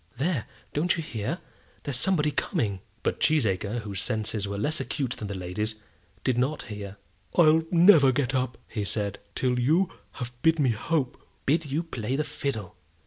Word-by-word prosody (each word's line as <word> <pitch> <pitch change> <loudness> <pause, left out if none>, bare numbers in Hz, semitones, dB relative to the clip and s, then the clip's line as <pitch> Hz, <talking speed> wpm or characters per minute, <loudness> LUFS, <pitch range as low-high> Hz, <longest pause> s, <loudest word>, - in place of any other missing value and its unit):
There; 145 -3 0 0.3
don't 170 +4 +2
you 165 - -2
hear? 110 -8 -3 0.5
There's 140 - -2
somebody 150 -4 +2
coming." 100 -8 -1 0.2
But - - 0
Cheesacre, 110 -6 +2
whose 100 -2 -3
senses 110 -2 -1
were 100 0 -3
less 150 +10 0
acute 135 -5 -2
than 110 - -4
the 100 - -4
lady's, 95 +4 -3 0.5
did 125 -2 +2
not 140 +4 0
hear. 100 -2 -7 0.4
"I'll 160 -2 +6
never 170 -6 +7
get 135 0 0
up," 130 -1 0 0.3
said 100 0 -1
he, 100 - -33
"till 125 -1 +1
you 160 +9 +3 0.2
have 125 -2 -5
bid 160 0 +4
me 135 -5 +3
hope." 130 +3 -1 0.2
"Bid 155 +1 +2
you 155 +5 +1
play 125 -6 -3
the 150 - +1
fiddle. 110 -11 -4
125 Hz, 170 wpm, -27 LUFS, 105-155 Hz, 0.5 s, never